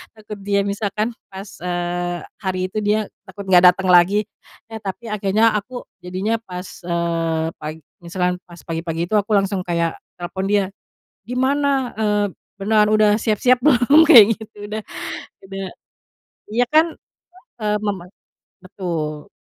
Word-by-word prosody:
takut 210 -1 -9
dia 200 0 +1
misalkan 205 +3 -2 0.2
pas, 195 +1 -9
eee, 175 0 -2 0.2
hari 185 -1 -1
itu 215 - -7
dia 210 0 +1 0.2
takut 200 +1 -9
nggak 180 -1 +7
datang 190 0 -3
lagi, 185 +4 +5 0.4
eh 225 - -6
tapi 210 +3 -6
akhirnya 210 +2 +2
aku 245 +4 -6 0.2
jadinya 190 +5 -2
pas 180 0 -6 0.2
eee 165 -2 -1
pagi, 155 +1 -6 0.2
misalkan 180 +1 -1
pas 175 0 -13
pagi-pagi 165 0 -3
itu 215 - +1
aku 210 +2 -1
langsung 195 -1 0
kayak 170 -1 0 0.2
telepon 190 +2 -3
dia, 205 -1 +4 0.7
"Gimana? 270 +3 +1 0.3
Eee, 210 -1 +2 0.3
beneran 210 +1 +3
udah 215 -1 +5
siap-siap 240 +4 +3
belum?" 285 +2 +6
Kayak 235 -10 +10
gitu, 220 -1 -12
udah 215 0 -4 0.7
udah, 195 0 -4 0.9
ya 240 +3 +3
kan, 320 +2 +7 0.8
eee, 210 0 +1
mema 190 -4 -2 0.6
betul, 160 -5 -4
195 Hz, 135 wpm, -20 LUFS, 175-215 Hz, 0.9 s, Kayak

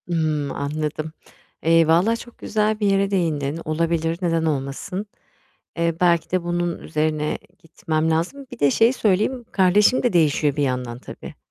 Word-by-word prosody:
Imm, 155 -4 -1
anladım. 155 +2 -3 0.5
Eee, 165 0 +4
valla 175 +8 +3
çok 240 +1 -11
güzel 215 0 0
bir 205 - +1
yere 195 0 +2
değindin, 160 -5 -1
olabilir 165 +1 0
neden 165 -2 +1
olmasın. 145 +6 -3 0.7
Eee, 170 -1 +1
belki 170 -2 +2
de 185 -1 0
bunun 175 0 -2
üzerine 155 -1 -1 0.2
gitmem 160 0 -2
lazım. 175 +13 -2
Bir - - -10
de 145 -1 +4
şeyi 230 - +4
söyleyeyim; 225 +3 0
kardeşim 205 +5 +4
de 245 - +1
değişiyor 150 -3 +2
bir 145 - 0
yandan 125 -3 -2
tabii, - - -10
165 Hz, 150 wpm, -22 LUFS, 155-190 Hz, 0.7 s, Eee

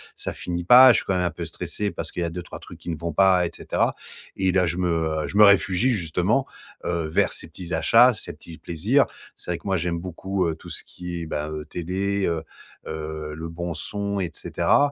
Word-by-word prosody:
ça - - -4
finit 85 0 -4
pas. 125 +7 +9
Je - - +2
suis - - -2
quand 95 - 0
même 90 - +1
un 90 - +1
peu - - -6
stressé 105 -1 -3
parce - - -6
qu'il 90 - -3
y - - 0
a 85 - -3
2-3 90 0 -7
trucs - - -12
qui - - -8
ne 80 - -2
vont 85 +1 -4
pas 95 +1 +4
et 85 - -4
cetera - - 0 0.4
et 95 -1 +1
là 90 -1 +3
je 85 +2 -2
me, 90 -1 0
heu, 80 -2 0
je 100 - -4
me 105 - +9
réfugie, 100 +4 +4
justement, 95 - +1 0.4
heu, 85 -2 -1
vers 80 - +2
ces - - -1
petits 85 +1 -8
achats, 115 +10 +6
ces - - -6
petits 80 -1 -12
plaisirs. 105 - +2 0.3
C'est - - -6
vrai 85 - -1
que 85 - -11
moi, 95 -1 +1
j'aime 85 0 -2
beaucoup, 95 +1 -2
heu, 80 - -2
tout - - -13
ce - - -7
qui 90 -1 -7
est, - - -5
ben, 75 0 -3
heu, 75 -1 -5
télé, 95 +3 -2
heu 85 -1 -1 0.5
heu, 75 -1 -5
le 80 +2 -6
bon 85 +1 -4
son 100 +5 -3
et 90 -3 -2
cetera 145 - +2
90 Hz, 240 wpm, -24 LUFS, 80-95 Hz, 0.5 s, pas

